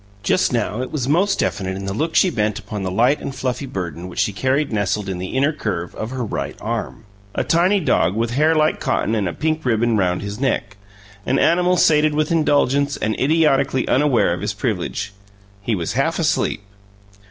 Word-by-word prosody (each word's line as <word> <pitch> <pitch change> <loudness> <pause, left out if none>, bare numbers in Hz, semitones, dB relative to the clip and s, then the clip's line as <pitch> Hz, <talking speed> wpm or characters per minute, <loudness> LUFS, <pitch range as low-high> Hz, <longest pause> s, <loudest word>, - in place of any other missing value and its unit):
Just 185 - +2
now 115 -1 -1
it 130 - -5
was 135 -5 -2
most 185 +7 +2
definite 95 -2 -1
in 95 - -6
the 100 - -3
look 160 +9 -2
she 185 - +4
bent 105 - -1
upon 105 -1 -6
the 95 - -2
light 120 +10 +2
and 135 - -5
fluffy 130 +2 -3
burden 90 - -5
which 90 - -11
she 105 - +1
carried 130 +6 0
nestled 100 0 -1
in 95 -2 -4
the 95 +7 -4
inner 140 +4 +2
curve 90 - -4
of 110 - -5
her 130 -1 -3
right 70 -8 -4
arm: 115 0 -4 0.3
a - - 0
tiny 180 +5 +3
dog 125 - +1
with 115 +1 -1
hair 155 +5 +3
like 155 0 +2
cotton 130 -5 0
and 105 -5 0
a - - -5
pink 155 +1 -1
ribbon 115 -2 +1
round 90 -2 0
his 100 +2 -6
neck 125 -6 -1 0.5
an 135 - +2
animal 180 +3 +3
sated 150 -2 +4
with 155 +1 0
indulgence 145 -3 +2
and 110 - -1
idiotically 140 -3 +2
unaware 130 -10 +3
of 90 - -5
his - - -2
privilege. 100 +1 -3 0.5
He 110 +2 -1
was 85 -3 -3
half - - 0
asleep! - - 0
125 Hz, 200 wpm, -20 LUFS, 100-150 Hz, 0.5 s, she